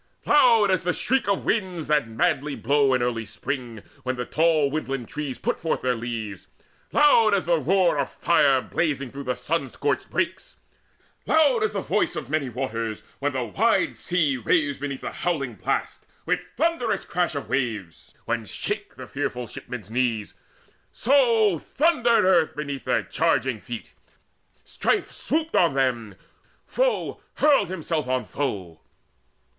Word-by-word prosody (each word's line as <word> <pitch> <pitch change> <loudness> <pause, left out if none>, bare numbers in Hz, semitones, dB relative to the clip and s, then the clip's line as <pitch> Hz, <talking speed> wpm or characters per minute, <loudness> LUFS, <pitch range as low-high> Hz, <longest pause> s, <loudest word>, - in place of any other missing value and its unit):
Loud 230 -8 +5
as 185 - +1
the 180 0 +1
shriek 260 +4 0
of 200 -1 0
winds 185 -7 -1
that 150 -5 +2
madly 145 +3 0
blow 140 -2 +2
In 125 - 0
early 120 -2 -1
spring, 115 +1 -5 0.2
when 130 0 -2
the 125 0 -4
tall 155 -2 +2
woodland 135 -5 -3
trees 145 -4 -4
Put - - -2
forth 160 - -2
their 125 -1 +2
leaves 115 -4 -5 0.4
loud 230 -8 +5
as 195 - -1
the 170 -1 +2
roar 175 +1 +2
of 140 - 0
fire 140 -6 +3
Blazing 140 -6 -2
through 135 -2 -3
sun 155 -2 -2
scorched 140 0 -2
brakes 185 +2 -2 0.7
loud 320 +10 +4
as 435 - 0
the - - -1
voice - - 0
Of - - -6
many 150 -4 0
waters, 115 -3 -4 0.2
when 145 0 -1
the 130 -1 -1
wide 230 - +1
sea 160 -7 0
raves 140 +4 +1
Beneath 140 -1 -4
the - - -4
howling 140 -8 -2
blast, 105 - -3 0.2
with - - +1 0.2
thunderous 320 -5 0
crash 175 -3 -1
Of 140 - -4
waves, 110 -10 -3
when 115 -1 -2
shake - - -4
the - - -8
fearful 125 0 -3
shipman's 110 -1 -8
knees; 115 -4 -1 0.6
So 230 - +3
thundered 250 - +2
earth 175 -4 +3
beneath 145 -2 -5
their - - +1
charging - - 0
feet. - - -8 0.7
Strife - - -1
swooped 320 +1 -2
on 170 -6 +4
them: 120 -6 0 0.5
foe - - -1
hurled 280 -10 +4
himself 165 -5 -2
on 130 -1 0
foe. 100 - -4
145 Hz, 150 wpm, -24 LUFS, 125-185 Hz, 0.7 s, Loud